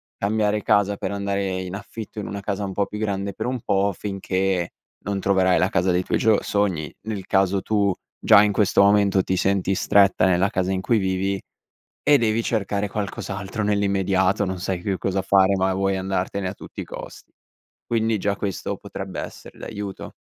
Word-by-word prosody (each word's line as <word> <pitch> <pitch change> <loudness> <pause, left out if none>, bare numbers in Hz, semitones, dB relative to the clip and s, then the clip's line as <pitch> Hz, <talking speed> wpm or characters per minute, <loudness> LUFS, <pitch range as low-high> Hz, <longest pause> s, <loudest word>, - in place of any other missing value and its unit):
cambiare 105 0 0
casa 100 -2 +2
per 95 - -3
andare 100 -2 -2
in 90 0 -6
affitto 105 +1 -7
in 100 - -5
una 100 0 -5
casa 100 0 -2
un 95 - -5
po' 100 +1 +1
più 105 - -7
grande 100 -2 -2
per 120 - -4
un 125 -1 -2
po', 100 0 +1
finché 95 -3 -1 0.3
non 100 -1 -1
troverai 95 -2 +3
la 95 - +2
casa 95 +1 +1
dei 90 0 +2
tuoi - - 0
gio 110 -2 +4
sogni, 95 -7 -1
nel 100 -4 -4
caso 95 0 +2
tu 100 -2 +2 0.3
già 100 - +7
in 105 - +2
questo 100 -1 +3
momento 100 -2 +4
ti 95 - -1
senti 95 +1 +1
stretta 100 0 +4
nella 95 +1 +3
casa 95 -2 0
in 95 0 -1
cui 110 +2 +2
vivi 95 +1 -1 0.6
e 145 - +6
devi 115 -2 +1
cercare 105 -2 -1
qualcos'altro 100 +1 -4
nell'immediato. 100 -1 +1
Non 95 -1 -4
sai 90 -1 -2
più 95 0 -1
cosa 95 +1 -1
fare 95 0 +4
ma 95 0 +1
vuoi 95 0 0
andartene 95 0 -2
a 95 - -5
tutti - - -9
i - - -4
costi. - - -10 0.5
Quindi 115 -1 +1
già 100 0 0
questo 100 -3 -3
potrebbe - - -6
essere - - -10
d'aiuto. 100 -1 -6
100 Hz, 185 wpm, -23 LUFS, 95-105 Hz, 0.6 s, già